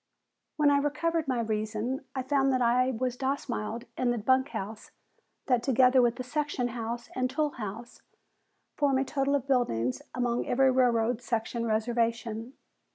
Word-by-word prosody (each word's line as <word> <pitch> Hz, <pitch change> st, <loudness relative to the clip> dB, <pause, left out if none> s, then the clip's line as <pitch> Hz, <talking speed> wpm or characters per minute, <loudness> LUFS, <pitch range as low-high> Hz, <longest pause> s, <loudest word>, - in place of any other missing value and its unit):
When 295 Hz, -2 st, +4 dB
I 285 Hz, -, +4 dB
recovered 315 Hz, +2 st, 0 dB
my 255 Hz, -3 st, 0 dB
reason, 220 Hz, +4 st, -2 dB
I 260 Hz, -, -1 dB
found 270 Hz, 0 st, +2 dB
that 255 Hz, -1 st, +1 dB
I 250 Hz, +2 st, +3 dB
was 250 Hz, 0 st, -2 dB
domiciled 250 Hz, -4 st, -3 dB
in 250 Hz, -, 0 dB
the 240 Hz, -, +1 dB
bunk 260 Hz, +5 st, +2 dB
house, 220 Hz, -1 st, -6 dB, 0.6 s
that 250 Hz, -4 st, +2 dB
together 255 Hz, +1 st, +4 dB
with 240 Hz, -1 st, +2 dB
the 255 Hz, -, -5 dB
section 280 Hz, -2 st, -2 dB
house 235 Hz, 0 st, -5 dB
and 255 Hz, 0 st, 0 dB
tool 295 Hz, +3 st, 0 dB
house 230 Hz, 0 st, -7 dB, 0.8 s
form 285 Hz, -2 st, +2 dB
the 265 Hz, -, +2 dB
total 275 Hz, +1 st, 0 dB
of 275 Hz, -3 st, -1 dB
buildings 130 Hz, -, 0 dB
upon 245 Hz, -1 st, 0 dB
every 265 Hz, +1 st, +4 dB
railroad 245 Hz, -2 st, +2 dB
"section" 230 Hz, 0 st, -2 dB
reservation. 230 Hz, +1 st, -1 dB
245 Hz, 160 wpm, -29 LUFS, 230-270 Hz, 0.8 s, When